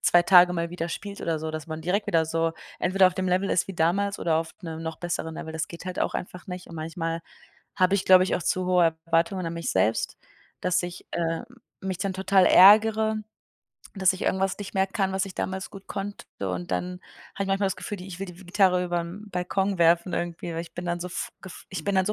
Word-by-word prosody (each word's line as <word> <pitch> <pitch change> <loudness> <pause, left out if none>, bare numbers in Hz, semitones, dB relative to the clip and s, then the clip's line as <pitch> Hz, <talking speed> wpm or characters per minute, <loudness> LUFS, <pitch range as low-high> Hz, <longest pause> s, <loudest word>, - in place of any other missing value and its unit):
2 175 0 +5
Tage 180 -1 +7
mal 170 -1 -2
wieder 170 -1 -3
spielt 200 +4 -6
oder 165 -2 -1
so, 160 0 -4
dass 155 +1 -6
man 160 0 -5
direkt 180 +6 -1
wieder 165 -1 +3
so 165 +1 0 0.3
entweder 185 +1 +4
auf 185 - 0
dem 185 0 -1
Level 185 +2 +1
ist 185 - +1
wie 190 - -5
damals 195 +5 +1
oder 165 -2 +1
auf 160 0 -2
'nem 165 -1 -6
noch 160 -1 -4
besseren 160 -2 -3
Level, 160 - -6
das 160 0 -3
geht 170 +1 -10
halt 185 0 -4
auch - - 0
einfach 180 +1 -6
nicht. 180 0 -6
Und 165 - -11
manchmal 165 +1 -3 0.6
habe 185 +1 +3
ich, 200 - +1
glaube 185 0 +7
ich, - - 0
auch 180 - -5
zu 185 +2 0
hohe 175 -3 +3
Erwartungen 170 +2 +1
an 165 - -3
mich 170 0 -3
selbst, 105 +4 +1 0.4
dass 180 0 +1
ich, 175 0 -7
ähm, 165 -1 -1 0.4
mich 190 -2 -2
dann 195 0 -1
total 190 0 +3
ärgere, 220 +3 +7 0.8
dass 190 -1 +3
ich 185 - -7
irgendwas 190 +1 0
nicht 205 -1 -7
mehr 190 0 +3
kann, 195 -1 -1
was 190 +1 0
ich 195 - -9
damals 190 0 -3
gut 195 -1 -12
konnte. 200 0 -5
Und 90 -3 -3
dann 180 0 -2 0.3
habe 200 - -2
ich - - -6
manchmal 195 +1 +1
das - - -3
Gefühl, 205 - -5
d 180 - -9
ich 185 -1 -8
will 195 - -3
die 175 -1 -11
w 190 - -13
Gitarre 180 0 +3
übern 175 +3 -3
Balkon 190 +2 -1
werfen 170 +2 +4
irgendwie, 170 0 -3
weil 165 - -2
ich 170 - -10
bin 175 - -5
dann 175 0 -1
so 180 - -3 0.6
ich 165 -5 -5
bin 200 - 0
dann 190 -1 +3
so 210 - +1
180 Hz, 240 wpm, -26 LUFS, 165-190 Hz, 0.8 s, Tage